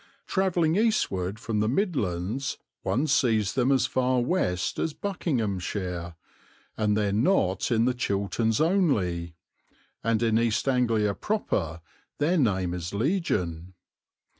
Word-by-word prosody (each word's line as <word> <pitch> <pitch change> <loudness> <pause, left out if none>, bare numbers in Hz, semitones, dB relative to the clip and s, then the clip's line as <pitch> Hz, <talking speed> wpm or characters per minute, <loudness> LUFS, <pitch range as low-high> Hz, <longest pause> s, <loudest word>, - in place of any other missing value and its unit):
Travelling 175 -4 +1
eastward 105 - +1
from 115 -1 -2
the 110 +1 +1
Midlands 125 - -1 0.2
one 135 +6 0
sees 115 -9 +2
them 130 0 +2
as 135 -2 +3
far 130 0 +1
west 120 - 0
as 160 - -1
Buckinghamshire, 100 - -3 0.6
and 105 -1 +1
there 105 -2 +1
not 105 - +2
in 115 0 +3
the 125 - +2
Chilterns 110 -1 0
only, 105 - +1 0.7
and 115 0 +1
in 110 -1 +3
East 115 +2 0
Anglia 115 -6 +2
proper 95 - -2 0.4
their 165 +4 +2
name 95 -8 +1
is 90 +2 -5
legion. 95 - -1
115 Hz, 120 wpm, -27 LUFS, 95-140 Hz, 0.7 s, as